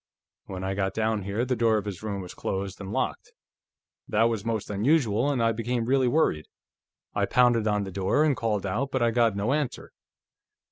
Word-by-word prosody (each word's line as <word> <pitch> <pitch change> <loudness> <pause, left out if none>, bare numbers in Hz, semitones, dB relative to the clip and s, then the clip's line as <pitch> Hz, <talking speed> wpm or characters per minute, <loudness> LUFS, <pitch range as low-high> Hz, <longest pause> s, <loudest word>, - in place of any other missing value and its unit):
"When 95 -1 -6
I 95 0 -1
got 95 0 -2
down 110 -1 0
here, 100 +5 -2
the 130 0 0
door 115 -1 +3
of 105 - -2
this 100 -4 -5
room 100 -2 -4
was 90 - -9
closed 95 +1 -4
and 95 0 -6
locked. - - -3 0.7
That 110 +2 +2
was 115 -3 +1
most 110 -2 -2
unusual, 120 +2 +2
and 130 -5 +1
I 115 - +3
became 115 +1 -2
really 130 +1 +2
worried. 120 - +1 0.7
I - - 0
pounded 120 -3 +3
on 105 -1 +1
the 95 - -6
door, 95 +10 +1
and 150 -3 +3
called 105 -4 -1
out, 120 +8 -1
but 130 -2 0
I 115 - +3
got 115 -3 +2
no 105 +6 0
answer. 145 -4 -3
110 Hz, 200 wpm, -26 LUFS, 100-125 Hz, 0.7 s, door